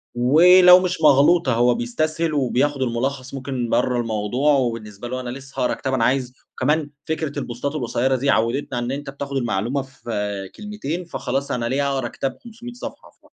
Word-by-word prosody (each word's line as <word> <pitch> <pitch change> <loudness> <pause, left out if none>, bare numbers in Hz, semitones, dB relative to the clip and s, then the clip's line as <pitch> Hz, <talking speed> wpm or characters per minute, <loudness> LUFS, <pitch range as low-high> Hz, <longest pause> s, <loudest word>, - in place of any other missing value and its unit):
ولو 180 +8 +7
مش 180 -2 -2
مغْلوطة، 145 0 +5
هو 120 +1 +3
بيسْتسْهل 155 +7 -1
وبياخد 140 +1 0
المُلخص 130 +2 -2
ممكن 130 -3 -3
برّا 125 0 +1
الموضوع 115 +6 0
وبالنسبة 115 -4 -2
له 130 +1 -4
أنا 125 -1 -5
لسه 135 +1 -8
هاقرا 125 - +1
كتاب 135 - -3
أنا 120 -3 +1
عايز 125 -1 0 0.3
كمان 150 +3 +1 0.2
فكرة 155 -2 -3
البُوستات 140 +3 -4
القصيرة 130 0 0
دي 140 +2 -1
عوِّدتْنا 120 +1 0
إن 120 +2 -3
أنت 140 +1 -5
بتاخد 140 0 -5
المعلومة 120 +2 -1
في 105 -7 -5
كلمتين، 210 -5 -5
فخلاص، 140 -3 -3
أنا 120 -1 -1
ليه 140 +4 0
هاقرا 135 -1 -1
كتاب 135 -1 -4
500 240 +1 -10
صفحة؟! 245 - -9
ف - - -32
135 Hz, 170 wpm, -22 LUFS, 120-145 Hz, 0.3 s, ولو